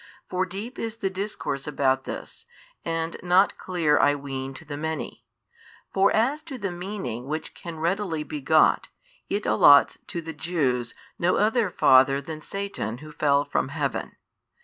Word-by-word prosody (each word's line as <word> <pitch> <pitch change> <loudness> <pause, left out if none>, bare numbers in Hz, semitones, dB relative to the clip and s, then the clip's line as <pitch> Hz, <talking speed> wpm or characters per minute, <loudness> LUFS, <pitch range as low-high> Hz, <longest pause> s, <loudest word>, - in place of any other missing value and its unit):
For 185 0 -1
deep 210 +8 -7
is 225 -1 -3
the 195 -4 -2
discourse 190 -8 -4
about 135 -2 +1
this, - - -7 0.4
and 165 0 -2
not 180 +3 +3
clear 165 -5 +1
I 145 0 +4
ween 135 -1 -5
to 160 - -11
the 145 -1 -6
many. 160 +2 -5 0.7
For 195 +1 +4
as 265 +8 +1
to 270 - -5
the 200 -5 -3
meaning 175 - -5
which 155 +2 -4
can 170 -2 -8
readily 170 -1 -1
be 150 -1 -6
got, 155 +3 +4 0.4
it 205 +1 -1
allots 145 -1 +6
|651 - - -42
to 170 - -4
the 160 0 -6
Jews 140 -8 -1 0.2
no 175 +2 +2
other 220 0 +2
father 135 -4 +5
than 155 +2 -7
Satan 195 - -4
who 155 +4 -11
fell 145 -2 +2
from 145 - 0
heaven. 145 0 -3
160 Hz, 165 wpm, -25 LUFS, 140-195 Hz, 0.7 s, allots